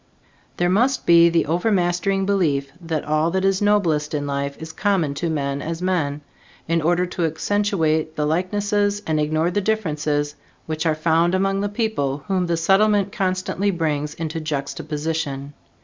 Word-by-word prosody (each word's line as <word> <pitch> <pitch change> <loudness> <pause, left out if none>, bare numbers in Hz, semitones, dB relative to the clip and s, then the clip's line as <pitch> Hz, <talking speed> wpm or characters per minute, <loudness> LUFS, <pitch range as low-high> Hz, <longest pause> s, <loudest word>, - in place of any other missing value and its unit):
There 175 - +2
must 245 +9 +2
be 170 0 +7
the 170 0 +2
overmastering 180 +2 +1
belief 150 -9 +1
that 165 -3 -3
all 155 +2 +1
that 190 +2 0
is 195 0 +2
noblest 170 -8 +2
in 145 -1 -2
life 140 0 -3
is 160 0 -8
common 185 -8 +1
to 165 +4 -2
men 140 -2 -2
as 165 +2 -4
men, 165 -6 -1 0.5
in 165 0 +1
order 175 +3 +2
to 175 -1 -2
accentuate 160 -3 0
the 150 - 0
likenesses 205 +5 0
and 155 -1 0
ignore 155 +3 +1
the 205 - 0
differences 150 -8 -1 0.3
which 160 +1 -2
are 155 - +2
found 165 +3 +2
among 195 +1 +1
the 205 - -1
people 200 - -2
whom 185 -2 0
the 170 -1 0
Settlement 200 +3 +3
constantly 190 -1 -1
brings 150 -5 -1
into 160 0 -4
juxtaposition. 150 -1 -3
165 Hz, 160 wpm, -22 LUFS, 150-195 Hz, 0.5 s, be